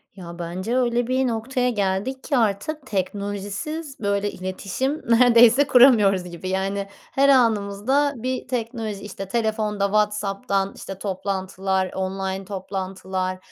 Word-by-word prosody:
Ya, 175 -2 -9
bence, 185 +8 -2
öyle 240 -1 +1
bir 260 +1 +1
noktaya 250 +2 -1
geldik 205 +4 -1
ki 280 - 0
artık 235 +7 -1
teknolojisiz 205 - -4
böyle 200 -1 0
iletişim 195 +10 -3
neredeyse 240 +3 +6
kuramıyoruz 230 -8 +6
gibi. 180 +1 -7
Yani, 195 +1 -1
her 275 +7 0
anımızda 235 +3 +2
bir 255 +2 -3
teknoloji, 230 -4 -3
işte, 195 -1 -7
telefonda 215 -2 0
WhatsApp'tan, 200 -1 0
işte, 195 - -8
toplantılar, 190 -1 -2
online 190 0 -3
toplantılar, 190 -1 -4
205 Hz, 115 wpm, -23 LUFS, 190-245 Hz, -, neredeyse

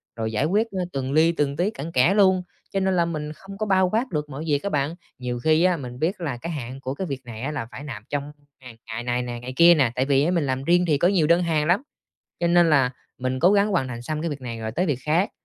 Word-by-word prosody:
rồi 110 -1 -3
giải 120 +7 0
quyết, 210 +7 +2
a, 185 -2 -2
từng 135 -1 -2
li 160 +3 +4
từng 145 -3 -1
tí 180 +4 +1
cặn 160 -2 -7
kẽ 145 +9 +4
luôn, 190 -3 +4 0.3
cho 195 - 0
nên 190 -1 +1
là 170 -1 +3
mình 150 -2 -4
không 195 +5 -11
có 215 - -2
bao 190 -2 +3
quát 235 +5 0
được 150 -2 -2
mọi 145 +2 -6
việc 145 -2 +1
á 200 - -1
bạn. 150 +2 -1 0.2
Nhiều 125 -1 -3
khi 155 +5 +3
á 180 -2 +3
mình 125 -2 -8
biết 180 +4 -1
là 140 -7 -3
cái 170 +7 -5
hạn 130 -3 -6
của 130 0 -3
cái 185 +6 -4
việc 135 -3 -4
này 115 -1 -8
á 145 +4 -2
là 115 - -3
phải - - -8
nạp 115 -8 -7
trong 145 0 -3 0.3
ngày 125 -3 -12
ngày 115 +2 -5
này 125 0 -1
nè, 120 -1 -5
ngày 125 +2 -7
kia 170 +2 +7
nè, 135 -7 +2
tại 130 - +1
vì 140 +4 +2
mình 170 -5 +1
làm 130 0 -2
riêng 175 +3 +3
thì 150 - +3
có 170 - +3
nhiều 180 -5 +2
đơn 170 +1 +4
hàng 155 -3 +1
lắm. 180 +8 +3 0.6
Cho 170 - +2
nên 170 -1 +4
là 135 -4 +4 0.3
mình 130 0 -2
cố 180 +7 +5
gắng 205 +1 +3
hoàn 150 -9 0
thành 120 -1 -6
xong 155 +4 -3
cái 165 -1 -2
việc 145 - -5
này 120 -3 -6
rồi 110 0 -3
tới 180 +10 0
việc 145 -6 0
khác, 165 +6 +2
150 Hz, 290 wpm, -24 LUFS, 130-175 Hz, 0.6 s, kia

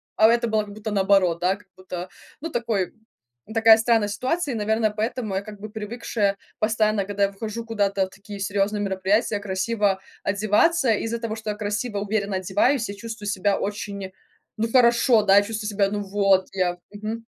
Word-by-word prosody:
а 220 - +6
это 235 0 +2
было 215 -1 +1
как 205 -1 -10
будто 215 0 -5
наоборот, 190 -4 +3
да, 185 +2 +2
как 205 0 -20
будто, 180 -1 -7 0.3
ну, 330 - -4
такой 225 -6 -1 0.6
такая 225 -1 +7
странная 225 -2 +2
ситуация, 265 +7 -1
и, - - -3
наверное, 220 +1 +1
поэтому 220 0 -3
я 195 - 0
как 205 -1 -11
бы 215 - -6
привыкшая 215 -1 -2 0.2
постоянно, 215 -2 +1
когда 200 0 -1
я 200 - +2
выхожу 220 +3 -5
куда-то 200 -3 0
в - - -18
такие 200 +2 -10
серьёзные 205 +1 0
мероприятия, 200 +2 +1
красиво 200 0 0 0.2
одеваться. 215 +9 +2
И 210 - 0
из-за 230 +1 -2
того, 225 -1 -4
что 215 -1 -3
я - - -5
красиво, 205 +1 -2
уверенно 200 -1 -1
одеваюсь, 210 +6 +1
я 200 - -5
чувствую 215 -1 -6
себя 200 0 +1
очень, 200 -1 -4 0.5
ну, 225 +1 0
хорошо, 235 -1 +5
да, 200 0 +6
чувствую 215 0 -4
себя, 200 -1 +1
ну, 205 0 -2
вот 195 -1 +2
я 180 -2 0 0.2
Мгм. 215 +2 -6
210 Hz, 185 wpm, -24 LUFS, 200-225 Hz, 0.6 s, такая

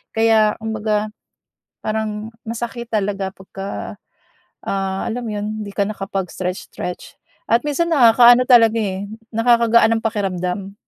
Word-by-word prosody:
kaya 220 -1 +3
kumbaga 215 -1 -1 0.7
parang 215 0 -3
masakit 235 +1 -5
talaga 200 -2 -1
pagka 195 +1 -7 0.7
ah, 195 -1 -2
alam 240 +2 -3
'yon, 210 +1 -4
‘di 200 - -7
ka 200 - +1
nakapag-stretch-stretch 190 -3 -5 0.3
at 230 +1 +2
minsan 300 +3 0
nakakaano 240 -2 +7
talaga, 230 -3 +6
eh, 195 -1 -3 0.2
nakakagaan 230 -1 +4
ng - - -9
pakiramdam. 195 -2 -2
215 Hz, 110 wpm, -20 LUFS, 195-230 Hz, 0.7 s, nakakaano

